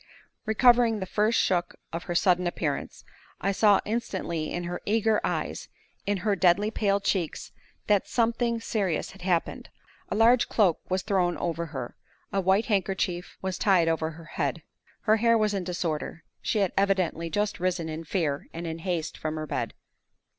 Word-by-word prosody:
Recovering 235 Hz, 0 st, +4 dB
the 190 Hz, -, -3 dB
first 215 Hz, +4 st, +2 dB
shook 175 Hz, -2 st, +1 dB, 0.2 s
of 170 Hz, -, -4 dB
her 175 Hz, -, -3 dB
sudden 180 Hz, 0 st, +3 dB
appearance, 155 Hz, -4 st, -3 dB, 0.3 s
I 195 Hz, -, 0 dB
saw 205 Hz, 0 st, +4 dB
instantly 190 Hz, -8 st, -2 dB
in 175 Hz, -, -3 dB
her 175 Hz, +1 st, -4 dB
eager 220 Hz, 0 st, +2 dB
eyes, -, -, -2 dB, 0.4 s
in 205 Hz, 0 st, +1 dB
her 205 Hz, -2 st, +3 dB
deadly 190 Hz, +3 st, +3 dB
pale 200 Hz, -2 st, +1 dB
cheeks, 185 Hz, -5 st, -2 dB, 0.3 s
that 205 Hz, -2 st, +2 dB
something 235 Hz, 0 st, +1 dB
serious 200 Hz, -7 st, -1 dB
had 195 Hz, -, -15 dB
happened. 175 Hz, -2 st, -1 dB, 0.4 s
A -, -, -1 dB
large 230 Hz, +3 st, +5 dB
cloak 190 Hz, -7 st, +3 dB
was 185 Hz, 0 st, 0 dB
thrown 185 Hz, -4 st, +1 dB
over 170 Hz, -1 st, -2 dB
her; 135 Hz, -5 st, -6 dB, 0.4 s
a 195 Hz, -, +2 dB
white 190 Hz, +4 st, +3 dB
handkerchief 190 Hz, -4 st, -1 dB
was 190 Hz, -1 st, -2 dB
tied 185 Hz, -5 st, +4 dB
over 160 Hz, -1 st, +1 dB
her 165 Hz, +1 st, -11 dB
head. -, -, -2 dB, 0.4 s
Her 215 Hz, 0 st, +3 dB
hair 230 Hz, +1 st, +4 dB
was 215 Hz, -1 st, +1 dB
in 195 Hz, -2 st, -1 dB
disorder; 170 Hz, -2 st, -3 dB, 0.2 s
she -, -, 0 dB
had 195 Hz, -3 st, +1 dB
evidently 185 Hz, -4 st, +1 dB
just 205 Hz, +3 st, -1 dB
risen 180 Hz, -2 st, -1 dB
in 160 Hz, +1 st, -5 dB
fear 155 Hz, -4 st, -1 dB
and 170 Hz, +1 st, -5 dB
in 165 Hz, 0 st, -4 dB
haste 165 Hz, -2 st, -3 dB
from 155 Hz, 0 st, -3 dB
her 155 Hz, 0 st, -3 dB
bed. -, -, -3 dB
190 Hz, 170 wpm, -27 LUFS, 170-210 Hz, 0.4 s, large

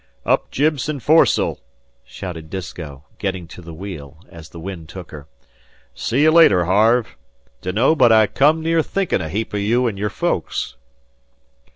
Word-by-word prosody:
"Up -, -, +1 dB
jib 150 Hz, +1 st, +1 dB
and 150 Hz, -2 st, -3 dB
fores'l!" 155 Hz, +7 st, +3 dB, 0.4 s
shouted 80 Hz, +4 st, -8 dB
Disko, 80 Hz, -6 st, -7 dB, 0.2 s
getting 95 Hz, -4 st, -3 dB
to 90 Hz, -, -11 dB
the 85 Hz, -1 st, -10 dB
wheel, 80 Hz, -5 st, -9 dB
as 80 Hz, -1 st, -12 dB
the 85 Hz, -, -11 dB
wind 85 Hz, -3 st, -8 dB
took 90 Hz, -3 st, -10 dB
her. 75 Hz, -1 st, -10 dB, 0.7 s
"See 130 Hz, +6 st, 0 dB
you 155 Hz, -, +5 dB
later, 100 Hz, -, +5 dB
Harve. 110 Hz, +6 st, +2 dB, 0.5 s
Dunno 105 Hz, -, +2 dB
but 125 Hz, -6 st, +5 dB
I 110 Hz, -1 st, +6 dB
come 150 Hz, +8 st, +2 dB
near 165 Hz, 0 st, +2 dB
thinkin' 195 Hz, +4 st, -1 dB
a 80 Hz, -, -5 dB
heap 105 Hz, +6 st, -3 dB
o' -, -, -1 dB
you 115 Hz, +5 st, +1 dB
an' 105 Hz, -4 st, -3 dB
your 105 Hz, +1 st, -2 dB
folks." 70 Hz, -7 st, -2 dB
100 Hz, 165 wpm, -20 LUFS, 85-125 Hz, 0.7 s, I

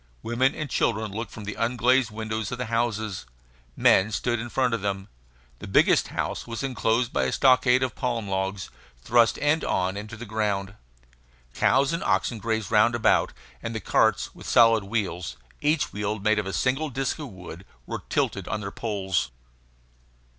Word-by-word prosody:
Women 120 Hz, +4 st, +1 dB
and 155 Hz, -, -4 dB
children 110 Hz, -4 st, 0 dB
looked 115 Hz, +4 st, -5 dB
from 110 Hz, -, -9 dB
the 105 Hz, +1 st, -4 dB
unglazed 120 Hz, +1 st, +2 dB
windows 110 Hz, 0 st, -4 dB
of 125 Hz, -, -3 dB
the 125 Hz, -, -3 dB
houses; 110 Hz, -, -1 dB, 0.5 s
men 95 Hz, +3 st, +4 dB
stood 120 Hz, +2 st, -1 dB
in 120 Hz, +1 st, -5 dB
front 125 Hz, -1 st, +1 dB
of 115 Hz, -, -1 dB
them. 100 Hz, 0 st, -3 dB, 0.5 s
The -, -, -8 dB
biggest -, -, +4 dB
house -, -, -3 dB
was 115 Hz, +2 st, -5 dB
enclosed 120 Hz, -2 st, 0 dB
by -, -, +1 dB
a -, -, 0 dB
stockade 130 Hz, -1 st, +4 dB
of 130 Hz, -4 st, -1 dB
palm 120 Hz, -5 st, -2 dB
logs, 95 Hz, 0 st, -3 dB, 0.3 s
thrust 120 Hz, -1 st, +4 dB
end 145 Hz, +2 st, +2 dB
on 95 Hz, +1 st, 0 dB
into 105 Hz, +2 st, -7 dB
the 120 Hz, -, -7 dB
ground. 100 Hz, -3 st, -2 dB, 0.8 s
Cows 135 Hz, +4 st, +3 dB
and 165 Hz, -, -2 dB
oxen 115 Hz, -, 0 dB
grazed 110 Hz, -1 st, -2 dB
round 115 Hz, +2 st, +4 dB
about; 120 Hz, -, +3 dB, 0.3 s
and 115 Hz, 0 st, -4 dB
carts -, -, +2 dB
with -, -, -9 dB
solid 115 Hz, -2 st, +5 dB
wheels, 90 Hz, -, -3 dB, 0.2 s
each 150 Hz, +1 st, +1 dB
wheel 105 Hz, +1 st, -2 dB
made 105 Hz, +1 st, +2 dB
of 105 Hz, -, -3 dB
a 95 Hz, -, -4 dB
single 135 Hz, +4 st, 0 dB
disk 135 Hz, +3 st, -2 dB
of 150 Hz, -, -5 dB
wood, 90 Hz, -2 st, -10 dB, 0.2 s
were -, -, -5 dB
tilted -, -, -1 dB
on 110 Hz, -, -2 dB
their 100 Hz, -1 st, -5 dB
poles. 100 Hz, -5 st, -2 dB
110 Hz, 175 wpm, -25 LUFS, 100-125 Hz, 0.8 s, solid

